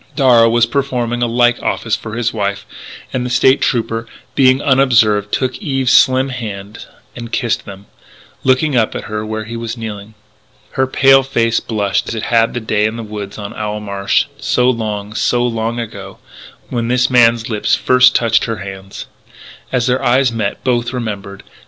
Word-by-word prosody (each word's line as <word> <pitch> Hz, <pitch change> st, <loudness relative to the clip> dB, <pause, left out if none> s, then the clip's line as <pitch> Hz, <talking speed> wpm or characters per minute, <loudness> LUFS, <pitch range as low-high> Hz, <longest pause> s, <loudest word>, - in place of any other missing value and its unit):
Darragh 120 Hz, -5 st, +5 dB
was 120 Hz, 0 st, +3 dB
performing 120 Hz, -2 st, -2 dB
a 120 Hz, -, +2 dB
like 120 Hz, +1 st, +2 dB
office 115 Hz, -2 st, -1 dB
for 110 Hz, 0 st, -8 dB
his 115 Hz, -1 st, -1 dB
wife, 100 Hz, -2 st, -3 dB, 0.5 s
and 130 Hz, -, -1 dB
the 125 Hz, -, -3 dB
State 130 Hz, +2 st, +3 dB
Trooper, 115 Hz, -1 st, -1 dB, 0.3 s
being 130 Hz, -1 st, +4 dB
unobserved, 115 Hz, -7 st, +3 dB
took 130 Hz, -1 st, -1 dB
Eve's 135 Hz, -9 st, -1 dB
slim 130 Hz, +1 st, +4 dB
hands 105 Hz, -4 st, -7 dB, 0.3 s
and 120 Hz, -1 st, -8 dB
kissed 120 Hz, -4 st, -1 dB
them, 100 Hz, 0 st, -11 dB, 0.6 s
looking 130 Hz, +2 st, +2 dB
up 115 Hz, -3 st, +1 dB
at -, -, -4 dB
her 105 Hz, 0 st, -4 dB
where 110 Hz, 0 st, -4 dB
he 115 Hz, +2 st, -8 dB
was 115 Hz, 0 st, -5 dB
kneeling. 110 Hz, -1 st, -7 dB, 0.6 s
Her 130 Hz, 0 st, 0 dB
pale 135 Hz, +1 st, +5 dB
face 115 Hz, -4 st, 0 dB
blushed 105 Hz, -3 st, -1 dB
as -, -, -4 dB
it 110 Hz, -, -4 dB
had 115 Hz, 0 st, +1 dB
that 120 Hz, -2 st, -4 dB
day 105 Hz, -1 st, +1 dB
in 110 Hz, -, -5 dB
the 115 Hz, -, -6 dB
woods 105 Hz, -2 st, -7 dB
on 105 Hz, 0 st, -7 dB
Owl 105 Hz, -1 st, -4 dB
Marsh, 100 Hz, -1 st, 0 dB
so 125 Hz, 0 st, +1 dB
long, 105 Hz, -3 st, -4 dB
so 120 Hz, +2 st, +1 dB
long 115 Hz, 0 st, -2 dB
ago, 100 Hz, -4 st, -7 dB, 0.5 s
when 120 Hz, -2 st, -2 dB
this 125 Hz, +1 st, +1 dB
man's 115 Hz, -2 st, +4 dB
lips 105 Hz, -3 st, +1 dB
first 125 Hz, 0 st, +4 dB
touched 115 Hz, -2 st, +2 dB
her 115 Hz, -2 st, -3 dB
hands. 95 Hz, 0 st, -8 dB, 0.7 s
As 125 Hz, -3 st, 0 dB
their 130 Hz, +1 st, 0 dB
eyes 130 Hz, 0 st, +3 dB
met 110 Hz, -3 st, -3 dB
both 120 Hz, -1 st, 0 dB
remembered. 100 Hz, -5 st, -5 dB
115 Hz, 175 wpm, -16 LUFS, 105-125 Hz, 0.7 s, Darragh